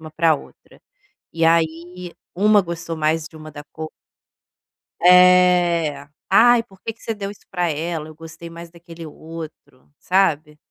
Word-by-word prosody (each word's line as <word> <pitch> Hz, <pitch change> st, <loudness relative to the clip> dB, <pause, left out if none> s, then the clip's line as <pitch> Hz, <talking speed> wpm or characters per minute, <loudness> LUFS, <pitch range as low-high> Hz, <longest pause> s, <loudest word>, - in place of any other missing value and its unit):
uma 155 Hz, -1 st, -10 dB
pra 160 Hz, 0 st, +2 dB
outra. -, -, -13 dB, 0.5 s
E 165 Hz, 0 st, 0 dB
aí 170 Hz, +2 st, -1 dB, 0.2 s
uma 210 Hz, +2 st, +4 dB
gostou 170 Hz, -2 st, -6 dB
mais 155 Hz, 0 st, 0 dB
de 160 Hz, -, -18 dB
uma 155 Hz, 0 st, -11 dB
da 145 Hz, 0 st, -10 dB
cor 155 Hz, -1 st, -7 dB, 1.1 s
É. 180 Hz, -4 st, +4 dB, 0.2 s
“Ai, 235 Hz, +4 st, +5 dB
por 190 Hz, -5 st, -22 dB
que 225 Hz, -, -5 dB
que 230 Hz, -, -28 dB
você 225 Hz, -, -3 dB
deu 200 Hz, -2 st, -6 dB
isso 205 Hz, -, -16 dB
pra 180 Hz, -2 st, -1 dB
ela? 160 Hz, 0 st, -4 dB
Eu 155 Hz, -, -13 dB
gostei 165 Hz, +1 st, -11 dB
mais 170 Hz, 0 st, -11 dB
daquele 170 Hz, -1 st, -12 dB
outro”, 155 Hz, -4 st, -11 dB
sabe? 155 Hz, -5 st, 0 dB
165 Hz, 155 wpm, -20 LUFS, 160-180 Hz, 1.1 s, Ai